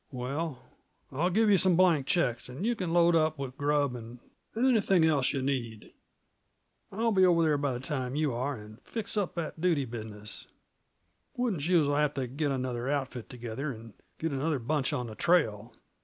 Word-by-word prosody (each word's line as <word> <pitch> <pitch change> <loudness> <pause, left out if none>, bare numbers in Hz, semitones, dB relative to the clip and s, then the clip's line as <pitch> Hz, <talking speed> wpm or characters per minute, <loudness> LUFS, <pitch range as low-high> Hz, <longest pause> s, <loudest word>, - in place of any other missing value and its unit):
"Well, 135 +1 -4 0.5
I'll 155 +7 +1
give 220 +4 +3
yuh 195 - +5
some 185 -1 +4
blank 165 -6 +4
checks, 125 -11 0
an' 130 +8 -6
you 235 +2 +1
can 185 -6 -3
load 170 0 +4
up 155 -1 +2
with 135 -2 -5
grub 145 -2 +1
and 120 0 -9 0.4
anything 220 -8 +4
else 145 -5 +2
yuh 135 -2 -2
need. 120 -5 -3 1.0
I'll 225 +3 0
be 190 -3 +4
over 170 -2 +5
there 150 -2 +2
by 140 -2 0
the 120 - -4
time 130 -2 -3
you 150 -3 +1
are, 130 +4 -2
and 105 +1 -12
fix 225 -3 -5
up 205 -4 -1
that 165 -1 -4
duty 165 -6 +2
business. 110 -3 -6 0.9
Wooden 240 -9 0
Shoes'll 150 -2 +2
have 150 0 +1
t' 135 -1 -1
get 140 +4 -2
another 130 -2 -2
outfit 135 -4 -3
together, 120 +4 -5
and 115 -2 -10 0.2
get 165 0 -2
another 145 +2 0
bunch 135 +2 -1
on 125 - -2
the 110 - -7
trail. 115 - +1
145 Hz, 185 wpm, -29 LUFS, 125-170 Hz, 1.0 s, yuh